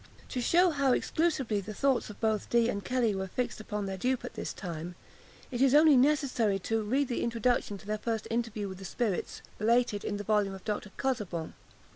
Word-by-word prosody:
To 250 - -2
shew 350 +8 +4
how 280 -4 +2
exclusively 270 -12 0
the 215 +2 -7
thoughts 270 -1 +1
both 220 -2 +1
of - - -24
Dee 235 0 +3
and 200 -3 -2
Kelly 245 -4 +1
were 190 0 -3
fixed 245 +5 -3
upon 210 -1 -4
their 190 -1 -4
dupe 255 +4 0
at - - -7
this - - -4
time, 175 -1 -6 0.6
it 245 0 -2
is 270 0 +5
only 305 -1 +7
necessary 255 -6 +3
to 225 +4 -1
read 260 +7 +1
the 240 - -2
introduction 235 -2 0
to 195 - -15
their 215 +1 -2
first 225 0 -2
interview 225 -3 -2
with 190 -1 -8
the - - -9
spirits, 205 0 -2 0.2
related 230 -1 +2
in 205 - -2
the 205 - -5
volume 205 -2 +1
of 190 - -12
Dr. 210 -1 -3
Casaubon. 210 - -2
225 Hz, 205 wpm, -30 LUFS, 205-255 Hz, 0.6 s, only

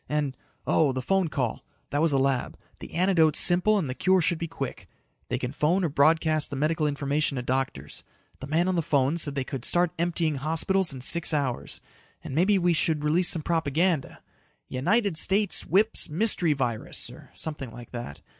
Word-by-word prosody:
And... 150 -3 -1 0.3
oh, 145 -4 +2
the 130 - -3
phone 190 +3 +1
call. 135 -6 -3 0.3
That 145 - 0
was 165 - +3
the 140 - +2
lab. 135 -2 -1 0.2
The - - -10
antidote's 170 -4 +3
simple 180 +4 +4
and 180 -8 -1
the 130 - -3
cure 185 +7 +2
should 170 0 +1
be 170 - -3
quick. 135 - -7 0.4
They - - -1
can 125 - -4
phone 165 +7 0
or 170 - 0
broadcast 155 +2 +2
the 145 - -5
medical 155 +2 0
information 145 0 -1
to 125 - -4
doctors. 130 - -3 0.4
The 135 - -8
man 165 +5 +1
on 185 - +1
the 170 - +1
phone 145 +1 0
said 145 -3 0
they 135 - -1
could 130 -1 -7
start 175 +2 +2
emptying 165 -3 0
hospitals 165 +5 +1
in 130 -2 -7
six 165 +4 +4
hours. 135 -4 -3 0.4
And - - -7
maybe 190 +7 +3
we 175 -1 +2
should 155 -2 +1
release 165 +4 +3
some 165 -4 +1
propaganda. 165 -1 -1 0.5
"United 180 - 0
States 200 +5 +1
whips 210 0 +3
mystery 175 -1 +2
virus," 125 -5 -3
or - - -14
something 150 -5 -5
like 120 +1 -12
that. 120 - -8
155 Hz, 190 wpm, -26 LUFS, 135-175 Hz, 0.5 s, simple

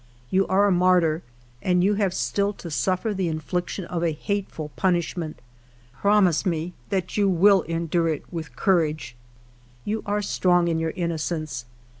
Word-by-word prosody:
You 190 +1 +3
are 195 +2 +3
a 200 - +3
martyr 180 -3 +3 0.4
and 180 -1 +2
you 200 +2 +3
have 200 -2 +1
still 200 +2 0
to 170 -4 -9
suffer 185 +7 0
the 190 -3 -1
infliction 175 +4 -3
of 170 -1 -3
a 165 -2 +1
hateful 175 -2 -3
punishment. 175 -3 -1 0.6
Promise 195 +1 +3
me 170 -1 -2 0.2
that 195 -1 -2
you 200 -1 +3
will 190 +2 +5
endure 165 0 0
it 155 -3 -1
with 160 -7 -6
courage. 155 -7 +1 0.4
" 120 0 -30
You 220 +1 -1
are 205 0 0
strong 175 -3 +2
in 165 -1 0
your 160 0 -1
innocence. 160 -6 -3
175 Hz, 160 wpm, -24 LUFS, 160-195 Hz, 0.6 s, will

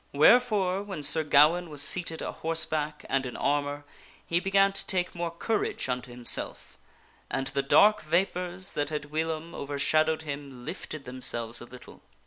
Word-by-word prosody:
Wherefore, 195 - +4
when 195 -7 -6
Sir 160 +2 +4
Gawaine 155 +4 +4
was 150 -2 -6
seated 165 +2 +1
a - - -3
horseback 155 -2 -1
and 135 -1 0
in 125 -2 -6
armor, 145 0 -1 0.4
he 170 - +1
began 195 +1 +3
to - - -1
take 180 -2 -1
more 170 -1 -3
courage 205 +3 -2
unto 125 0 -3
himself, 120 0 -2 0.5
and 135 - -2
the 140 0 -1
dark 205 +10 +5
vapors 180 +2 -1
that 145 -1 -1
had 150 -1 -5
whilom 160 +1 -3
overshadowed 155 +3 0
him 140 -4 -7
lifted 155 -3 -7
themselves 120 -2 -2
a - - -8
little. 125 +1 -14
155 Hz, 155 wpm, -28 LUFS, 140-175 Hz, 0.5 s, dark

